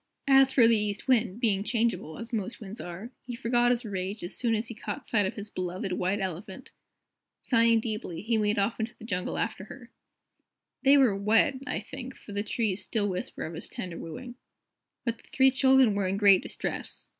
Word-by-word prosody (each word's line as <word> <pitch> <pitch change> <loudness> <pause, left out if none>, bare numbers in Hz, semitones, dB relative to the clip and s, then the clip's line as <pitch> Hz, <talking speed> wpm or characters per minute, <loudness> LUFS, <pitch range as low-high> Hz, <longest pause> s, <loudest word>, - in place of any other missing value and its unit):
As 270 -1 +6
for 245 -4 +6
the 230 - +5
East 210 +1 -2
Wind, 230 -5 +2
being 205 -5 +1
changeable, 225 -8 -1
as 230 +1 -8
most 220 +1 -3
winds 210 0 -8
are, 180 +7 -7
he 245 -1 -7
forgot 240 0 +2
his 245 0 0
rage 195 0 -4
as 175 - -3
soon 235 -2 +1
as 220 +1 -2
he 235 - -6
caught 235 +3 -6
sight 205 -4 +2
of - - -5
his 205 0 -7
beloved 185 +1 -3
White 185 +3 0
Elephant. 190 0 -6 0.7
Sighing 230 -2 +4
deeply, 215 -6 -4
he 225 +1 +1
made 210 0 +1
off 205 +4 0
into 230 +2 -3
the 225 - -11
jungle 185 -5 -2
after 210 -3 -2
her. 240 +1 -12 0.9
There 275 0 +5
they - - +7
were 255 -8 +4
wed, 225 +6 +2
I - - -2
think, 265 -1 -8
for - - -13
the 200 0 -1
trees 210 -2 -1
still 205 +1 -1
whisper 185 -1 -4
of 160 - -6
his 160 - -6
tender 175 -2 -6
wooing. 245 +10 -7 0.7
But 235 -1 -2
the - - -21
three 265 0 +5
children 265 -3 +5
were 200 -2 0
in 190 +1 -1
great 200 -2 +6
distress. - - -5
220 Hz, 205 wpm, -28 LUFS, 195-240 Hz, 0.9 s, they